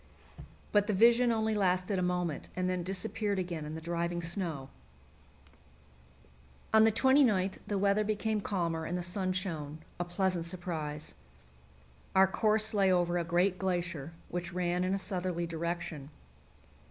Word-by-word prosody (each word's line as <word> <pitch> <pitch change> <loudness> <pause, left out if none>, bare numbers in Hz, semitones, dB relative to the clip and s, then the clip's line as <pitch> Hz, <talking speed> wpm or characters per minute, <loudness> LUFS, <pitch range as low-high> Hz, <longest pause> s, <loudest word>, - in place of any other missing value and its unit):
But 205 -1 +3
the 210 - +1
vision 235 +3 +5
only 220 -1 +1
lasted 185 -1 +1
a - - 0
moment, 180 -3 -1
and 185 0 0
then 185 -1 0
disappeared 205 +3 -2
again 175 -4 -3
in 155 +1 -5
the - - -4
driving 170 +1 -2
snow. 165 -6 -3 2.0
On 220 0 +7
the 225 - +5
29th 225 -6 +3
the 205 - -1
weather 200 +2 +3
became 215 0 -1
calmer 170 -5 -1
and 175 - -2
the 180 - -3
sun 185 +1 -1
shone 160 -5 -3 0.2
a - - +1
pleasant 175 -1 -1
surprise. 165 -4 -5 1.0
Our 190 0 +8
course 215 +3 +1
lay 195 -2 +4
over 175 -1 +2
a - - 0
great 175 +3 +1
glacier, 175 -5 -2 0.2
which 175 0 -4
ran 180 0 0
in 185 +1 +1
a - - 0
southerly 180 -3 -2
direction. 165 -3 -4
180 Hz, 150 wpm, -31 LUFS, 170-200 Hz, 2.0 s, Our